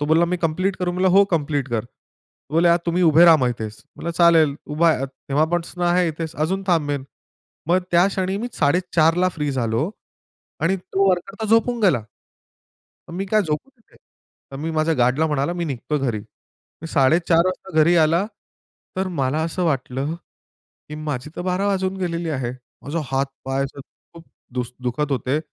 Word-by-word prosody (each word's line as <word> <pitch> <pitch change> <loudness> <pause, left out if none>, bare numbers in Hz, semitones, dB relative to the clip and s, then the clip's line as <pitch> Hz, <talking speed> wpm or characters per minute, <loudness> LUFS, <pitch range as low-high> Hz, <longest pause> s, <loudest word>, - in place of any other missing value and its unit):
तो 145 - 0
बोलला, 160 +2 +4
"मी 180 +1 -1
कंप्लीट 185 +4 0
करू?" 180 -1 -2
म्हणलं, 185 +1 +2
"हो 195 +2 +6
कंप्लीट 145 -4 0
कर." 115 -2 0
तर 130 - -27
बोलले, 170 +1 +4
"आ 170 - +5
तुम्ही 175 +2 +1
उभे 165 +1 +6
रहा 165 -2 +8
मग 130 -4 +1
इथेच." 110 -3 -6
म्हणलं 170 - -4
चालेल 165 -4 +5 0.2
उभा 165 +1 +4
आहे. 135 -3 0
तेव्हापासून 160 +6 -2
आहे 175 0 +3
इथेच 160 +1 -5
अजून 185 +6 -1
थांबेल. 145 -6 0 0.6
मग 180 +2 +4
त्या 175 +2 +5
क्षणी 190 0 -2
मी 240 +3 -3
4:30 165 +1 +2
ला - - +4
फ्री 150 -4 -3
झालो 120 - -1 0.7
आणि 190 +4 +2
तो 195 +1 0
वर्कर 180 +2 -2
तर - - -1
झोपून 230 +1 +3
गेला. 170 - +3 1.1
मग 170 - -8
मी 195 +2 -2
काय 215 +1 +2
झोपू 155 - -3
तिथे? 235 -4 -27 0.5
तर 135 - -7
मी 160 +3 -3
माझ्या 160 0 +1
गार्डला 130 +5 +2
म्हणाला 150 +2 0
मी 175 -1 -3
निघतो 145 +1 -2
घरी. 120 -6 -1 0.6
मी 165 - -6
4:30 165 +5 +3
वाजता 185 -2 -3
घरी 170 +3 +5
आला. 165 +4 +3 0.7
तर 190 0 0
मला 135 +3 +1
असं 175 +2 -2
वाटलं 140 0 -1 0.7
की 150 - -7
माझी 150 -2 -4
तर - - -4
बारा 185 +2 0
वाजून 190 -1 0
गेलेले 170 -3 -2
आहे. 130 -5 -2 0.3
माझा 150 +5 -3
हातपाय 135 0 -2
असं 140 +1 -8
खूप 165 +4 -18 0.3
दुस 125 -1 -3
दुखत 140 +4 -2
होते. 135 +3 0
165 Hz, 180 wpm, -22 LUFS, 140-180 Hz, 1.1 s, रहा